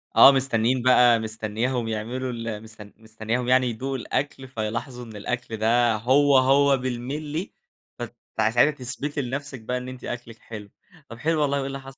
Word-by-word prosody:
آه -, -, +10 dB
مستنيين 130 Hz, -2 st, +1 dB
بقى 125 Hz, -2 st, +5 dB
مستنياهم 110 Hz, +2 st, -2 dB
يعملوا 120 Hz, +4 st, -3 dB
ال 115 Hz, -2 st, -5 dB
مستن 110 Hz, -2 st, -13 dB
مستنياهم 110 Hz, +2 st, -3 dB
يعني 130 Hz, 0 st, +4 dB
يدوقوا 130 Hz, +4 st, -3 dB
الأكْل، 135 Hz, +1 st, -3 dB
فيلاحظوا 120 Hz, +1 st, -4 dB
إن 110 Hz, -2 st, -11 dB
الأكْل 115 Hz, +2 st, -4 dB
ده 115 Hz, +1 st, +3 dB
هو 135 Hz, +5 st, +4 dB
هو 135 Hz, +1 st, +4 dB
بالملّي، 140 Hz, +7 st, -4 dB, 0.5 s
فت -, -, -6 dB, 0.2 s
ساعتها 115 Hz, +6 st, +4 dB
تثبتي 145 Hz, +1 st, -4 dB
لنَفسِك 135 Hz, 0 st, -5 dB
بقى 125 Hz, +3 st, -2 dB
إن 125 Hz, 0 st, -6 dB
أنتِ 130 Hz, -1 st, -10 dB
أكلِك 115 Hz, -2 st, -7 dB
حلو، 105 Hz, -3 st, -9 dB, 0.4 s
طب 115 Hz, -, -9 dB
حلو 155 Hz, +4 st, 0 dB
والله، 140 Hz, -1 st, +1 dB
وإيه 135 Hz, -1 st, -2 dB
اللي 135 Hz, 0 st, -5 dB
حصل؟ 135 Hz, 0 st, -12 dB
125 Hz, 165 wpm, -24 LUFS, 115-135 Hz, 0.5 s, آه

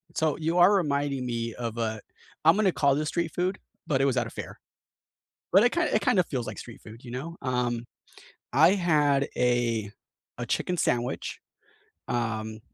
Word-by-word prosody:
So 155 Hz, -2 st, +1 dB
you 165 Hz, +2 st, -1 dB
are 180 Hz, +3 st, +7 dB
reminding 140 Hz, -7 st, 0 dB
me 115 Hz, -1 st, -3 dB
of 115 Hz, -2 st, -5 dB
a 110 Hz, -2 st, -2 dB, 0.4 s
I'm 165 Hz, +2 st, +7 dB
gonna 205 Hz, -2 st, +3 dB
call 140 Hz, -4 st, +2 dB
this 150 Hz, +1 st, -1 dB
street 170 Hz, -2 st, -2 dB
food, 185 Hz, +2 st, -1 dB, 0.3 s
but 135 Hz, -3 st, +1 dB
it -, -, +3 dB
was 135 Hz, -2 st, +1 dB
at 120 Hz, -1 st, +1 dB
a -, -, -7 dB
fair. -, -, -8 dB, 0.9 s
But 195 Hz, +5 st, +7 dB
it 245 Hz, -, +3 dB
kinda 345 Hz, 0 st, +1 dB
it 215 Hz, -, +3 dB
kinda 190 Hz, -2 st, +4 dB
feels 125 Hz, -7 st, -3 dB
like -, -, -6 dB
street 115 Hz, -, -10 dB
food, 110 Hz, +3 st, -13 dB
you 120 Hz, -, -9 dB
know? 145 Hz, +8 st, -6 dB
Um, 125 Hz, -2 st, -1 dB, 0.7 s
I 155 Hz, +6 st, +6 dB
had 150 Hz, -7 st, +2 dB
a 120 Hz, -4 st, +1 dB, 0.5 s
a -, -, -4 dB
chicken 180 Hz, -, -1 dB
sandwich. 120 Hz, -3 st, -1 dB, 0.7 s
Um, 110 Hz, -2 st, -2 dB
135 Hz, 180 wpm, -27 LUFS, 120-165 Hz, 0.9 s, are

